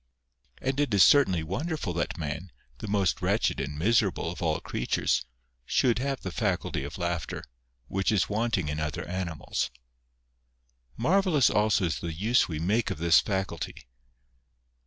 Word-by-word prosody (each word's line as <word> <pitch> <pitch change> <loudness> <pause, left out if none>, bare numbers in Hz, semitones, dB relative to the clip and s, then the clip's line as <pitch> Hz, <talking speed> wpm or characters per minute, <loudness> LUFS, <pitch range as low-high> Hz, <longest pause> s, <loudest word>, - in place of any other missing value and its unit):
And 135 +1 -1
it 145 -4 +1
is 100 - +7
certainly 95 - +5
wonderful 140 - -3
that 85 +3 -2
man, 80 +2 -5 0.3
the - - -6
most 100 -3 +1
wretched - - +1
and 70 +1 -4
miserable 100 -2 +1
of 85 - -8
all 80 -2 +1
creatures, - - 0 0.4
should 120 - +2
have 135 +1 -2
the - - -5
faculty 95 - -1
of 70 +2 -6
laughter, 85 -2 -3 0.4
which 95 +6 0
is 100 -4 +2
wanting 110 -5 0
in 75 +1 -2
other 75 0 -3
animals. 85 -7 -3 1.3
Marvellous 165 - +3
also 105 -2 +2
is 85 - -1
the - - -5
u^e 100 +10 +2
we 80 - -4
make 100 +8 +1
of - - -3
this 85 +2 +5
faculty 95 -5 -3
95 Hz, 150 wpm, -28 LUFS, 80-115 Hz, 1.3 s, is